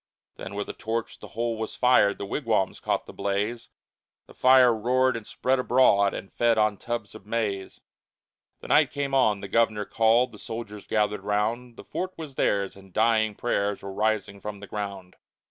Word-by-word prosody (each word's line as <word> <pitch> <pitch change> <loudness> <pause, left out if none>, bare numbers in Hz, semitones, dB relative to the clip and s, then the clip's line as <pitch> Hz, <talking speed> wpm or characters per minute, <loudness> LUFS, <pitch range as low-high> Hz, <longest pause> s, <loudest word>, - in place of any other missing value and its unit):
Then - - -7
with 105 - -3
a - - -5
torch 115 +1 -4
the - - -10
whole 115 -1 -1
was 110 - -4
fired, 125 -5 +4
The 100 - -5
wigwams 110 -3 -1
caught - - -1
the - - -11
blaze, 105 +4 -2 0.6
The - - -16
fire 130 -2 +6
roared 125 +3 +2
and 115 -2 -7
spread 130 +1 0
abroad 120 -6 +4
And 100 - -8
fed 115 -1 +2
on 105 -1 +2
tubs 120 -2 -5
of 110 -2 -13
maize. 105 -4 -3 0.8
The - - -10
night - - +5
came 140 -1 -3
on, 110 -7 +3
the 100 - -6
governor 110 0 +1
called, 115 +4 +3
The 105 - -13
soldiers 110 -3 -7
gathered 105 -1 0
round; 110 +4 -2
The - - -10
fort 185 +1 -4
was 155 -4 -7
theirs, 100 -6 0
and 95 -1 -16
dying 110 0 +2
prayers 100 -4 -1
Were 100 0 -6
rising 105 -1 -1
from 105 0 -6
the 100 - -9
ground. 100 -3 -6
110 Hz, 185 wpm, -26 LUFS, 100-120 Hz, 0.8 s, fire